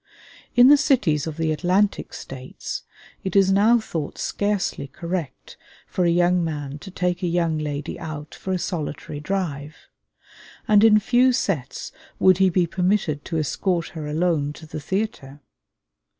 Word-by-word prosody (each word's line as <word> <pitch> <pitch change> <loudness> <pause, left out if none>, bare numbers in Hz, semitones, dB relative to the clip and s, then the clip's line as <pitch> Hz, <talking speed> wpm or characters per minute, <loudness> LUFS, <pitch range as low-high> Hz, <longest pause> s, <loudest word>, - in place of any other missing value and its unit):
In 245 0 +8
the 290 - +8
cities 210 - +2
of 160 -1 -5
the 160 -1 0
Atlantic 185 +6 +1
States 130 -1 -7 0.4
it 190 - -4
is 195 -1 +5
now 210 +5 +5
thought 165 -9 -4
scarcely 200 -8 -1
correct 170 -1 -6 0.3
for 180 - -1
a - - +4
young 175 +1 +3
man 145 -3 -4
to 190 - -10
take 180 -1 -1
a 180 - 0
young 165 -2 0
lady 145 -1 -4
out 150 -2 -7
for 190 - -6
a 185 - +1
solitary 155 -4 -4
drive; 150 -4 -3 0.9
and 210 -1 +5
in 215 -1 +7
few 245 +4 +4
sets 180 - -2 0.3
would 185 -1 +5
he 190 -1 +5
be 180 0 +2
permitted 180 -4 0
to 165 - -3
escort 170 +3 -1
her 160 -5 -6
alone 150 -2 0
to 160 - -12
the 155 - -6
theatre. 150 -5 -3
175 Hz, 155 wpm, -23 LUFS, 150-195 Hz, 0.9 s, In